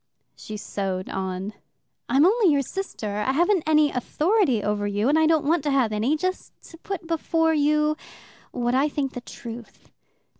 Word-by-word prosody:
She 215 - -8
sewed 190 -2 -4
on. 190 +2 -4 0.6
"I'm 270 +5 +5
only 410 -2 +4
your 280 -1 +2
sister. 230 - -5
I 235 +5 0
haven't 350 +5 +3
any 305 -1 +4
authority 300 - +1
over 205 0 -1
you, 205 +3 0
and 305 +2 +4
I 315 - +4
don't 315 -2 +2
want 325 +2 +2
to - - +1
have 265 -5 +2
any. 235 +9 +1
Just 370 +4 -4
to 330 - -12
put 370 -2 -5
before 325 0 +1
you 300 0 +2 0.5
what 240 0 -1
I 275 +4 +3
think 275 -2 -2
the 245 - -6
truth. 235 -1 -10
285 Hz, 175 wpm, -24 LUFS, 220-320 Hz, 0.6 s, I'm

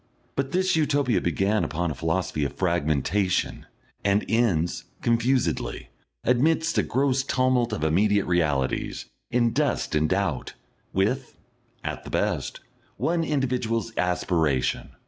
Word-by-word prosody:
But 135 0 -1
this 185 0 +2
Utopia 145 - +2
began 95 +6 +1
upon 85 +1 -1
a - - -2
philosophy 80 +1 -1
of 70 - -2
fragmentation, 85 +2 0 0.4
and 100 +1 +2
ends, 100 -8 +1 0.2
confusedly, 115 - 0 0.3
amidst 160 +7 +2
a - - +5
gross 135 0 +1
tumult 130 -2 +1
of 110 - -3
immediate 100 +6 +3
realities, 75 -7 0 0.2
in 120 -1 +2
dust 145 - 0
and 75 0 +2
doubt, 95 -8 -1 0.4
with, 120 +8 -1 0.5
at - - -4
the - - -9
best, - - -1 0.4
one 165 0 +1
individual's 125 -6 -1
aspiration. 80 -7 0
105 Hz, 120 wpm, -25 LUFS, 85-130 Hz, 0.5 s, a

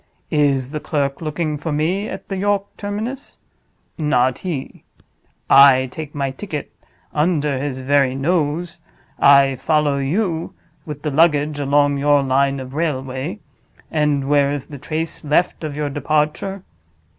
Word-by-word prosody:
Is 140 -3 +1
the 150 - -3
clerk 140 -2 -2
looking 155 -1 -2
for 160 +2 -4
me 175 +8 0
at - - -8
the 195 - -4
York 200 +1 +1
terminus? 215 +7 -5 0.6
Not 130 -5 +2
he. 165 -8 -5 0.6
I 135 -2 +7
take 150 0 -7
my 140 -2 -1
ticket 150 0 -6 0.4
under 150 -3 +1
his 135 -2 -4
very 135 -1 +2
nose; 160 +3 -1 0.4
I 140 -1 +5
follow 150 0 +1
you 165 +4 -1 0.3
with 150 -2 -7
the 150 - -1
luggage 150 -1 +2
along 145 0 +2
your 145 0 +3
line 135 +1 +1
of 130 0 -8
railway—and 145 0 -3
where 140 -1 +3
is 145 -2 -4
the 145 -2 -10
trace 155 +3 -4
left 155 +4 +1
of 150 -2 -4
your 150 -1 -2
departure? 155 +6 -1
145 Hz, 135 wpm, -20 LUFS, 140-160 Hz, 0.6 s, I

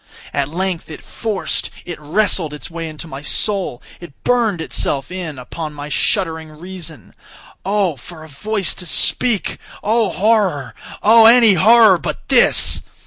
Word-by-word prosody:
At 140 -1 0
length 180 +1 -3
it 155 - -10
forced—it 195 -5 -5
wrestled 160 -1 0
its 150 - -10
way 165 -1 -5
into 155 +1 -9
my 135 -2 -8
soul—it 175 - -3
burned 230 -7 +1
itself 140 -3 -2
in 175 -6 -6
upon 150 +4 -7
my 145 0 -7
shuddering 160 +2 -1
reason. 165 - -10 0.5
Oh! 195 -4 0
for 155 +6 -12
a - - -11
voice 200 +6 -2
to 180 - -7
speak!—oh! 220 +2 0
horror!—oh! 210 +3 +2
any 230 -3 +7
horror 210 +1 +6
but - - -6
this! - - +3
175 Hz, 130 wpm, -18 LUFS, 155-210 Hz, 0.5 s, any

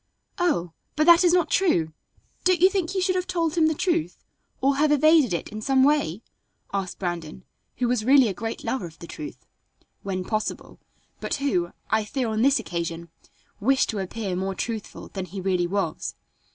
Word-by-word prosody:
"Oh! 295 - +1 0.2
but 305 - +3
that 340 +1 +7
is 350 - +5
not 350 -3 +2
true. 170 - +2 0.5
Don't 365 -2 +3
you 370 +3 +6
think 375 -2 -1
you 380 - +1
should 370 0 +1
have 365 0 -1
told 335 -4 0
him 325 -2 +3
the 315 - 0
truth, 335 -1 -1 0.4
or 275 +1 +2
have 300 +1 +3
evaded 300 - +5
it 170 - -2
in 215 0 -7
some 265 +3 +3
way?" 265 - +1 0.5
asked 195 -2 -3
Brandon, 175 -1 -5 0.3
who 250 - +1
was 240 -3 0
really 265 +1 +6
a 200 - -1
great 225 +4 -5
lover 210 -9 -2
of 160 - -15
the - - -10
truth, 305 - -9 0.6
"when 185 -2 -3
possible," 215 +2 -4 0.4
but - - -2
who, 180 -12 0 0.2
I 220 0 +3
fear 245 +2 -2
on 220 0 -1
this 275 +3 +4
occasion, 170 -4 -4 0.5
wished 260 +6 +2
to 215 - -2
appear 195 0 -3
more 190 +1 -2
truthful 225 0 -5
than 190 -2 -5
he 190 +3 -7
really 180 -2 0
was. 195 -3 -2
230 Hz, 190 wpm, -25 LUFS, 185-310 Hz, 0.6 s, that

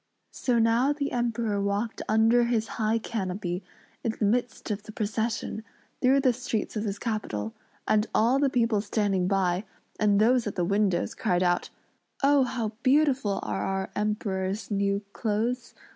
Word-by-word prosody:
So 245 -2 0
now 230 +5 +3
the 285 -1 -3
Emperor 235 -4 0
walked 200 +3 -1
under 225 +2 +4
his 230 -2 0
high 220 +1 +2
canopy 190 -5 -3 0.4
in 230 - 0
the 210 - +1
midst 240 +1 -1
of 205 0 -2
the 215 - -10
procession, 220 +1 -2 0.4
through 270 +2 +4
the 255 -2 +3
streets 235 -3 -3
of 215 +1 -2
his 200 -1 -2
capital; 155 - -3 0.3
and 215 +1 +3
all 240 +5 +3
the 280 -1 +3
people 230 -4 +2
standing 200 -3 0
by, 185 -1 +1 0.4
and 205 -2 +3
those 235 +1 +3
at 205 - -4
the 175 - 0
windows, 200 -1 +1
cried 180 0 +1
out, 175 -1 +1 0.5
"Oh! 280 0 +5
How 240 -4 -2
beautiful 265 -6 +2
are - - -2
our 195 0 -2
Emperor's 210 -1 -2
new 200 0 0
clothes! 235 +3 -2
215 Hz, 160 wpm, -27 LUFS, 200-240 Hz, 0.5 s, Oh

